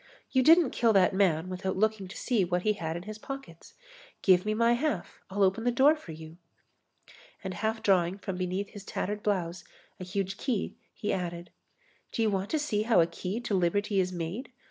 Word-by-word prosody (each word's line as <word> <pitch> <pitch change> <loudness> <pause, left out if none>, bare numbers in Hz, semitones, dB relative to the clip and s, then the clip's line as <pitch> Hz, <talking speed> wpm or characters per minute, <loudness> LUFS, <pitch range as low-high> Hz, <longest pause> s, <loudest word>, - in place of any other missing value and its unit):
You 260 - +4
didn't 325 +1 +6
kill 230 -2 +3
that 190 -2 +4
man 185 -4 +2
without 185 +1 -3
looking 215 -1 +1
to 185 - -9
see 235 -6 +1
what 180 0 -1
he 215 - +3
had 165 -4 -4
in 175 - -7
his 215 +2 -8
pockets. 270 -11 -9 0.5
Give 185 0 +5
me 215 - +1
my 230 +1 +4
half. 240 - -2
I'll 200 +1 +1
open 195 +4 +2
the 245 - +2
door 275 +5 +5
for 300 - -11
you." 160 +1 -10 1.1
And 190 -1 -4
half 220 +4 -2
drawing 185 -1 +3
from 195 -2 -5
beneath 185 +2 -2
his 205 - -10
tattered 205 +1 -3
blouse 180 -4 -1 0.4
a - - -5
huge 195 +1 -3
key, 245 -7 -2 0.2
he 210 - -2
added: 175 -2 -4 0.6
"Do 225 - 0
you 215 - +2
want 195 0 -1
to 315 - +1
see 290 -9 0
how 225 -1 +3
a 165 - +6
key 180 +5 -4
to 225 - -3
liberty 195 +3 +1
is 185 -1 +1
made? 180 - -5
195 Hz, 205 wpm, -29 LUFS, 180-220 Hz, 1.1 s, didn't